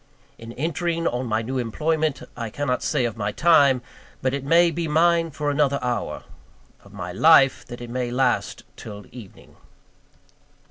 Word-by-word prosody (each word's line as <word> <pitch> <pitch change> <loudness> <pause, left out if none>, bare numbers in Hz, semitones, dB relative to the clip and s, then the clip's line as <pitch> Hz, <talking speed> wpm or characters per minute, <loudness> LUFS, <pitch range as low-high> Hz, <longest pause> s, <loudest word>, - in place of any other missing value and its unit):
In 115 0 -9
entering 170 +3 -2
on 125 -2 -1
my 110 0 -1
new 130 +3 -3
employment, 155 +5 -1
I 115 -2 -5
cannot 125 +1 -2
say 125 - 0
of 115 -3 -4
my 105 -1 -2
time, 140 -4 +4 0.4
that 130 0 +1
it 140 -1 -3
may 170 +4 +4
be 165 +1 -3
mine 165 +2 +3
for 150 -1 -2
another 140 -1 +1
hour; 125 -1 -3 0.6
of - - -17
my 90 - -6
life, 135 - +5
that 120 -1 -9
it 120 - -8
may 125 0 -2
last 125 0 0
till 105 -2 -10
evening. 115 -6 -14
135 Hz, 160 wpm, -23 LUFS, 120-160 Hz, 0.6 s, life